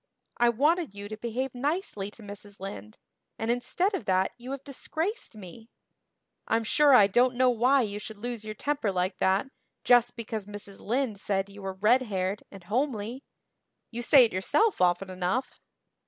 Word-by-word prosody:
I 240 0 +4
wanted 295 - +1
you 200 0 -7
to 215 - -5
behave 240 +3 -3
nicely 275 - -2
to 215 +2 -15
Mrs. 205 0 -9
Lynde, 105 - -8 0.4
and 225 +1 0
instead 355 - 0
of 315 - -3
that 185 0 +2
you 245 +1 -10
have 275 0 -5
disgraced 320 - -4
me. 215 +3 -12 0.8
I'm 225 0 +1
sure 285 +5 +5
I 205 - +8
don't 245 +5 +3
know 255 0 +4
why 250 +4 +3
you 205 -1 -4
should 215 0 -8
lose 235 0 -5
your 215 0 -6
temper 285 -5 -1
like 185 +1 -1
that 195 +8 +1 0.3
just 245 0 +4
because 220 -3 -5
Mrs. 205 -1 -8
Lynde 235 -2 -1
said 195 -1 -1
you 200 0 -12
were 195 -1 -4
red 215 +7 +3
haired 195 -4 -2
and 195 -3 -12
homely. 235 +3 -2 0.7
You 240 0 -4
say 255 +1 +7
it 225 - -3
yourself 375 - +1
often 180 +1 +2
enough." 185 +8 -2
225 Hz, 175 wpm, -28 LUFS, 200-255 Hz, 0.8 s, I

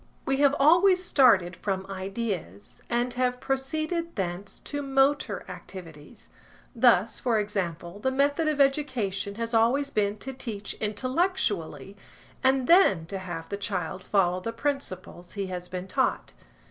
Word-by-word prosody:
We 270 0 +1
have 280 0 +4
always 360 +5 +5
started 200 - +4
from 190 +1 -3
ideas, 190 - -5
and 240 +1 0
have 250 0 0
proceeded 310 +6 -2
thence 190 -1 -4
to 290 0 -4
motor 275 +1 +1
activities; 165 -6 -11 0.4
thus, 230 -3 +4
for 240 -3 +1
example, 190 -3 -3
the 260 - 0
method 285 +4 +1
of 305 -2 0
education 245 -9 0
has 230 +1 -4
always 255 +6 +2
been 205 -2 0
to 265 +5 -7
teach 215 -6 -6
intellectually, 210 - -1 0.5
and 265 0 +3
then 245 - +5
to 190 +4 -5
have 175 -3 -6
the 200 - -3
child 185 -2 -3
follow 185 -3 +2
the 230 +5 -4
principles 230 -10 -4
he 200 -2 -3
has 180 0 -5
been 185 0 -5
taught. 185 - -1
225 Hz, 140 wpm, -27 LUFS, 185-270 Hz, 0.5 s, always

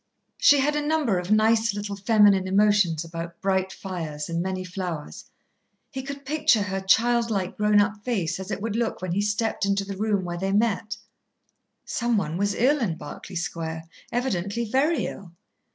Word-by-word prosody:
She 290 - +6
had 295 +2 +1
a 295 - +1
number 295 - +1
of 180 +1 -6
nice, 220 0 +3
little 205 0 -4
feminine 200 -2 +4
emotions 195 -4 +3
about 170 0 -7
bright 190 -1 0
fires 165 -7 -5
and 170 0 -1
many 185 0 -3
flowers. 180 -4 -6 0.7
He 265 -2 -4
could 280 +1 -8
picture 280 -7 +2
her 195 -1 -3
childlike 225 -1 +2
grown 210 0 +3
up 205 0 0
face 185 -9 -1
as 190 +1 -7
it 205 - -4
would 225 -2 -2
look 230 -5 -2
when 185 - -2
he 195 +4 +1
stepped 210 +2 -1
into 200 0 +1
the 200 0 -5
room 205 -2 0
where 175 0 -4
they 195 +1 -1
met. 220 0 0 0.9
Some 240 -1 0
one 165 -5 -2
was 200 +1 0
ill 280 +5 +3
in 185 -10 -1
Berkeley 185 - -9
Square, 165 -1 -4 0.3
evidently 235 -2 -1
very 270 +4 +1
ill. 175 -4 -8
200 Hz, 175 wpm, -25 LUFS, 185-230 Hz, 0.9 s, She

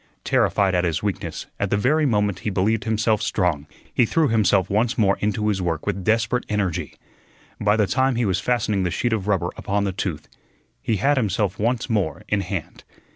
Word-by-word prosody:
Terrified 100 -2 +2
at 90 -1 +2
his 85 -1 -1
weakness 100 -2 -3
at 100 - 0
the 105 - +1
very 150 +8 +2
moment 105 -5 +1
he 105 - -3
believed 105 +2 0
himself 110 -1 +1
strong, 80 -7 0 0.3
he - - +3
threw 155 +5 +2
himself 105 -4 +3
once 110 +5 0
more 100 -4 +3
into 105 +1 -1
his 100 -3 0
work 85 -3 -2
with 100 -2 -2
desperate 115 +3 +1
energy. 100 -5 -2 0.6
By 105 +1 +2
the 105 - +3
time 130 +4 +1
he 120 0 +1
was 95 -2 +1
fastening 105 -2 0
the 90 - 0
sheet 120 +6 -1
of 105 -3 -2
rubber 95 -4 0
upon 100 +1 -1
the 100 - 0
tooth, 90 -5 -4 0.5
he 110 - 0
had 140 +8 +2
himself 100 -4 0
once 115 +2 0
more 95 - -1
in 105 -1 +1
hand. 90 -3 -5
105 Hz, 195 wpm, -23 LUFS, 95-110 Hz, 0.6 s, he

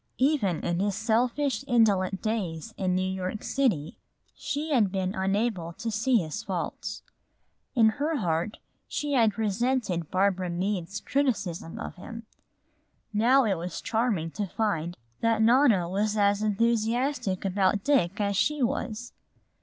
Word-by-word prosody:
Even 255 - +2
in 175 0 -1
his 200 0 0
selfish, 240 +4 +1
indolent 200 -6 +2
days 215 -3 -3
in 185 -2 0
New 185 - +1
York 190 +2 -3
City 215 - 0 0.3
she 300 +2 -4
had 220 -9 +3
been 190 -1 -1
unable 195 -3 -1
to 225 +6 -4
see 230 +4 +2
his 170 +1 -2
faults. 195 +2 -4 0.7
In 225 -3 +6
her 295 +8 -1
heart 175 -1 -1 0.3
she 295 -1 -2
had 225 -5 +3
resented 215 - 0
Barbara 190 -1 +1
Meade's 185 +2 -2
criticism 200 -12 -1
of - - -6
him. 230 +5 -9 0.9
Now 245 +6 +5
it 210 -4 +2
was 175 +1 -5
charming 220 -8 0
to 205 +2 -3
find 175 -4 -2 0.2
that 230 -1 +2
Nona 230 -6 +4
was 205 +4 0
as 205 0 +3
enthusiastic 230 0 0
about 195 +1 +1
Dick 220 -9 +2
as 200 -1 0
she 295 +6 +1
was. 240 -2 -2
210 Hz, 140 wpm, -27 LUFS, 185-235 Hz, 0.9 s, In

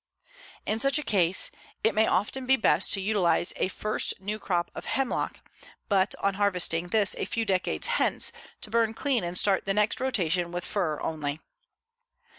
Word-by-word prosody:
In 215 +1 -1
such 275 +4 +3
a 300 - -2
case 190 -7 +2 0.3
it 220 - +3
may 220 0 +3
often 250 +7 -1
be 265 - +5
best 225 - +3
to 195 - +2
utilize 190 -4 +1
a - - +1
first 215 +3 -1
new 210 +3 -4
crop 175 -4 -1
of - - -8
hemlock, 270 -2 -2 0.5
but 195 -1 +2
on 200 - +1
harvesting 180 -4 +1
this 205 +2 +2
a - - -1
few 230 -1 -2
decades 190 -3 0
hence 485 +1 +1 0.3
to - - -6
burn 225 -1 +1
clean 260 -3 0
and 175 +1 -3
start 195 -1 +2
the 195 -1 -1
next 210 0 +1
rotation 180 -9 0
with 175 0 -4
fir 160 -7 -2
only. 150 -2 -3
200 Hz, 175 wpm, -27 LUFS, 175-225 Hz, 0.5 s, be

